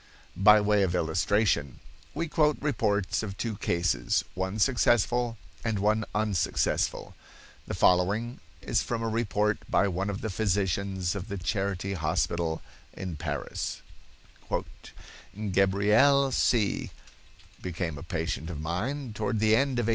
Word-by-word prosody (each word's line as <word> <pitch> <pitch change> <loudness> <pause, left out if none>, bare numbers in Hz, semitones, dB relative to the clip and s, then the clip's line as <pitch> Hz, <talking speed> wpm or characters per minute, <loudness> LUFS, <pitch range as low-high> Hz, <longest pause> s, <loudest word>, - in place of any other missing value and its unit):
By 105 +1 +8
way 105 0 +3
of 90 -2 +1
illustration, 90 - +1 0.4
we 165 +3 -1
quote 150 -1 +2
reports 105 -9 0
of 100 -3 -6
two 115 -3 -2
cases, 85 -4 0
one 95 +2 -3
successful 120 0 +2 0.3
and 110 -2 0
one 105 +2 +1
unsuccessful. 105 -5 0 0.5
The - - -3
following 100 +7 +2 0.2
is - - +1
from 115 -1 -3
a - - 0
report 105 -2 0
by 100 - +3
one 95 +2 -2
of 100 0 -4
the 110 - -3
physicians 95 -2 0
of 100 -1 -5
the 100 -2 -4
Charity 95 +2 -2
hospital 80 -1 -1 0.3
in 90 -3 -5
Paris: 75 -2 -4 1.7
"Gabrielle 105 +9 +4
C——— 115 -5 +1 0.7
became 85 -4 -4
a - - -9
patient 80 - -3
of 80 -4 -5
mine 110 - -3
toward 110 +2 -1
the 110 +1 +4
end 135 0 +1
of 120 - +1
1886. - - 0
100 Hz, 130 wpm, -28 LUFS, 90-115 Hz, 1.7 s, By